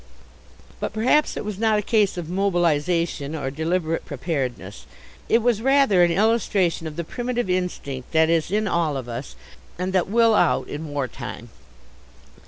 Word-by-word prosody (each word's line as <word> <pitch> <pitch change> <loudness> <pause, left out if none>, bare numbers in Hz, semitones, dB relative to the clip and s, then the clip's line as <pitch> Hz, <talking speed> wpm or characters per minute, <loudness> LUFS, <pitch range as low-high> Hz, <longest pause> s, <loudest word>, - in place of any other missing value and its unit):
But - - -3
perhaps 255 +8 +2
it - - -4
was 210 -2 -5
not 220 -1 +3
a 210 - -1
case 210 -4 +2
of 170 -3 -4
mobilization, 170 -4 0
or 135 -3 -3
deliberate 165 +2 -1
preparedness. 130 - -4 0.4
It 230 0 +3
was 235 -3 +2
rather 270 -7 +4
an 175 - +5
illustration 195 -4 +1
of 155 - -7
the 170 - -3
primitive 245 +2 -3
instinct 155 -8 -3
that 160 0 +4
is 165 -1 +1
in 210 +2 0
all 165 -6 0
of 130 -2 -6
us 120 +3 -6 0.4
and 185 +1 -3
that 185 -1 +1
will 230 +1 +4
out - - +2
in 155 +2 -6
"war 145 -3 -2
time." 120 -2 -8
175 Hz, 165 wpm, -23 LUFS, 150-210 Hz, 0.4 s, an